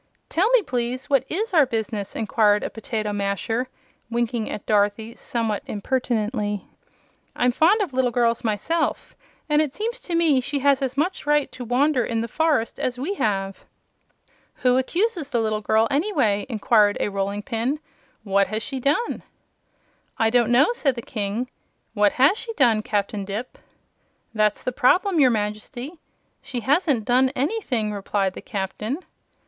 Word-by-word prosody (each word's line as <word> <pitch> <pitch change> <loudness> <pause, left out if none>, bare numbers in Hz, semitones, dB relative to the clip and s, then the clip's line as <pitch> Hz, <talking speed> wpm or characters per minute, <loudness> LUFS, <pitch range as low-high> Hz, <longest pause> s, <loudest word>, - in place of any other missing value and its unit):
"Tell 375 +7 +2
me, - - +4
please, 250 0 -3
what 270 -2 +3
IS 420 +5 -2
our 305 -6 +5
business?" 220 -4 -3
inquired 210 -2 +2
a - - -3
potato 215 -2 -3
masher, 205 +5 -1 0.4
winking 235 -1 -1
at 205 - -6
Dorothy 210 +2 +1
somewhat 225 -3 -2
impertinently. 215 -2 -1 0.7
"I'm 245 0 +2
fond 350 - +4
of 360 -9 -2
little 255 -1 +2
girls, 235 -1 +1
myself, 275 +10 -1 0.3
and 300 0 +3
it 295 -3 -2
seems 460 +3 -3
to 345 - -4
me 315 -6 +3
she 280 +3 -3
has 280 0 +3
as 265 0 -2
much 315 +1 -1
right 295 -1 +2
to 250 - -8
wander 255 +2 +2
in 225 -1 -1
the 230 - -3
forest 295 -3 0
as 250 -1 -2
we 295 +10 -2
have." 195 - -2 1.0
"Who 250 -1 +4
accuses 340 - 0
the 240 - 0
little 215 -1 0
girl, 220 +2 +2
anyway?" 280 - +1
inquired 215 -2 +3
a - - 0
rolling 200 +1 -2
pin. 250 +5 -2 0.4
"What 200 -1 +2
has 220 +1 -3
she 270 -2 -4
done?" 290 - 0 1.0
"I 225 0 +2
don't 240 -1 +3
know," 255 +4 +5
said 275 - 0
the 235 - -6
King. 220 -1 -3 0.5
"What 205 -2 +3
has 285 - +4
she 460 - -6
done, 235 - +3
Captain 205 -1 -2
Dipp?" 205 +5 -6 0.7
"That's 215 -1 +1
the 255 - -1
trouble, 355 - +3
your 265 -3 +6
Majesty. 240 +8 -4 0.4
She 245 -3 -5
hasn't 275 - +2
done 255 +1 +3
anything," 255 - -1
replied 195 -1 -1
the - - -8
Captain. 210 +5 -3
240 Hz, 160 wpm, -23 LUFS, 215-285 Hz, 1.0 s, your